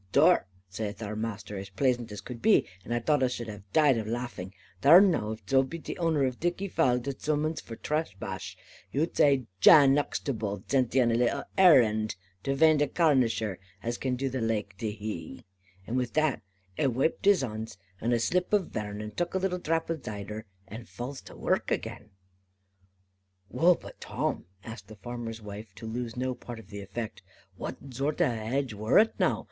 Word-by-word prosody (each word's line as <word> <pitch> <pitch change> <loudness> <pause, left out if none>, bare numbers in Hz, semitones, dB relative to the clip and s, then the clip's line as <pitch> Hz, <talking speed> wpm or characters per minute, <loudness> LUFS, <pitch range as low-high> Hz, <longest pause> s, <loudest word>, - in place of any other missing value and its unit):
"'Thar,' - - +5 0.3
zaith 105 +1 -4
our 105 0 -4
Maister, 105 -2 -4
as 95 0 -8
plaisant 120 +2 0
as 105 - -6
cud 125 -2 -8
be, 220 - +5 0.2
and - - -9
ai 120 - +2
thought 145 +4 +2
us 125 -1 +2
shud 120 -2 -5
have 105 -2 -10
died 145 -6 +4
of 110 - -4
laffing, 115 -5 -4 0.3
'thar 160 +6 +9
now, 175 - +3
if 110 -3 -12
zo 135 0 +5
be 135 +5 -5
the 165 - -6
owner 160 -4 +2
of 130 -1 -3
thiccy 175 +3 -1
falde 125 -9 +2 0.2
zummons 155 +1 0
e - - -11
for 115 - -8
traspash, 150 - -4 0.4
you 150 +4 +1
zay 140 -4 +4
Jan 140 - +8
Uxtable 110 -8 -3
zent 130 -3 +1
e 130 - +6
on 120 -1 +3
a - - +1
little 120 +4 +1
arrand, 115 - +5 0.3
to 135 +4 -1
vaind 155 +1 +5
a 145 - +3
Carnisher 120 - +2 0.2
as 120 +1 -3
can 130 -1 -1
do 135 +2 -2
the 130 0 -2
laike 105 -4 -1
to 110 -2 -1
he.' 105 -6 -6 0.4
And 120 - -2
wi' 125 -1 +1
that, 155 -3 +1 0.4
a 140 - +3
waiped 135 - 0
his 200 -7 +5
hons 110 -4 -5 0.2
with 115 - 0
a 120 - +3
slip 180 +10 0
of 200 -4 +2
vern, 105 -1 -4
and 105 0 -7
tuk 175 +1 -2
a - - +4
little 185 -1 -1
drap 165 -1 0
of 160 -3 -3
zider, 105 +1 -6 0.2
and 115 +3 -9
full 125 +3 -5
to's 135 - -11
wark - - 0
again." 110 - -3 1.4
"Wull, 175 +2 +5
but - - -13
Tim," - - -2 0.2
asked 110 -3 -9
the 110 - -11
farmer's 115 +1 -6
wife, 105 -1 -9
to - - -9
lose 115 +1 -4
no 130 +1 -1
part 120 -1 -9
of 110 -3 -13
the 100 0 -6
effect, 110 +3 -6 0.3
"what - - -5 0.2
zort 140 +6 -1
of 165 -7 +3
a - - -3
hadge 120 +3 -2
wor 110 +4 +2
it 220 +1 +5
now? - - +2
120 Hz, 200 wpm, -29 LUFS, 110-145 Hz, 1.4 s, thar